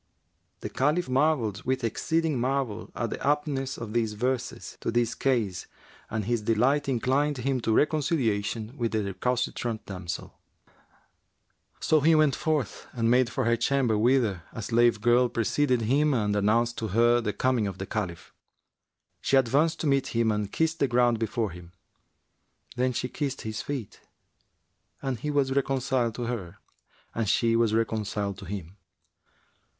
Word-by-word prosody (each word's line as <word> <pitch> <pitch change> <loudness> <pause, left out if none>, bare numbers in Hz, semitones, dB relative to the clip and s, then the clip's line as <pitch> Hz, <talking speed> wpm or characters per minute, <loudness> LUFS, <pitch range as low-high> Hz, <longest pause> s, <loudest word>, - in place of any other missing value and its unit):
The - - -4
Caliph 150 +5 +1
marvelled 130 -6 +1
with 130 0 -1
exceeding 155 +5 0
marvel 130 -4 -1
at 115 - -2
the - - -4
aptness 140 -2 0
of 110 -2 -6
these 115 -2 0
verses 125 +4 -3
to - - -2
his 120 0 +1
case 115 -9 -1 0.4
and 110 -2 -2
his 120 0 0
delight 125 +7 +2
inclined 135 +3 +1
him 130 +1 -1
to 115 - 0
reconciliation 120 -6 0
with 120 -5 -2
the 110 -1 +1
recalcitrant 120 +2 -2
damsel. 90 -3 -6 1.4
So 155 - +3
he 160 +3 +5
went 155 -4 +4
forth 150 - -2
and 115 -1 +1
made 125 -1 +4
for 130 - -2
her 115 0 +3
chamber 120 -1 +1
whither 110 -4 +2
a 115 - -6
slave 120 -1 +3
girl 120 +2 +4
preceded 125 +2 +1
him 140 +6 +2
and 105 -3 0
announced 115 +4 +1
to 110 - -2
her 120 +4 +3
the 105 - -1
coming 125 -2 +1
of 95 -2 -5
the 95 - -4
Caliph. 95 -5 -5 0.9
She 135 - +3
advanced 140 +6 +2
to - - -2
meet 140 -2 +2
him 115 -1 +3
and 105 -1 -2
kissed 160 0 0
the 140 - +3
ground 120 -2 +2
before 110 -2 -1
him; 85 +1 -12 1.0
then 130 +1 +1
she 125 - -2
kissed 135 0 -3
his 110 -1 -4
feet 135 -8 -6 1.0
and 135 -4 -3
he 150 - -3
was 140 -2 +1
reconciled 130 -4 0
to 120 - -4
her 100 -6 -4 0.6
and 115 -3 -1
she 115 -1 +3
was 115 -2 +2
reconciled 105 -3 -1
to - - -9
him. 95 -1 -7
120 Hz, 155 wpm, -27 LUFS, 110-135 Hz, 1.4 s, he